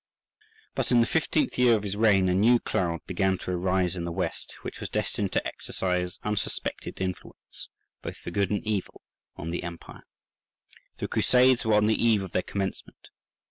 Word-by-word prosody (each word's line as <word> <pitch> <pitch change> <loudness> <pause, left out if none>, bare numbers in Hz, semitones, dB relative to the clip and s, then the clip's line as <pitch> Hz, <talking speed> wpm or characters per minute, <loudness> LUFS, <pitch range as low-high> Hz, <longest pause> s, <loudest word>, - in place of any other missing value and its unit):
But - - -2
in 120 - +6
the 115 - +5
fifteenth 160 - 0
year 125 -2 +6
of 105 - -2
his 100 -1 -3
reign 105 -3 +4
a 90 - +2
new 110 +6 +5
cloud 85 -7 -1
began 95 +1 +1
to 90 - -5
arise 90 0 +1
in 85 - -4
the 85 - -3
west, - - -4
which - - -6
was - - -5
destined - - -1
to - - +1
exercise 90 -1 -2
unsuspected 105 -1 -3
influence, 95 -1 -6 0.3
both - - -6
for - - -7
good 100 -2 +1
and 105 0 -1
evil, 105 -3 -3 0.3
on 85 - -5
the 85 - -2
empire. 85 -1 -9 0.9
The - - -3
Crusades 125 -1 +4
were 110 - +4
on 105 0 +4
the 110 +1 +2
eve 110 -4 +4
of 95 - -7
their 90 - +1
commencement. 95 0 -5
100 Hz, 180 wpm, -27 LUFS, 90-110 Hz, 0.9 s, in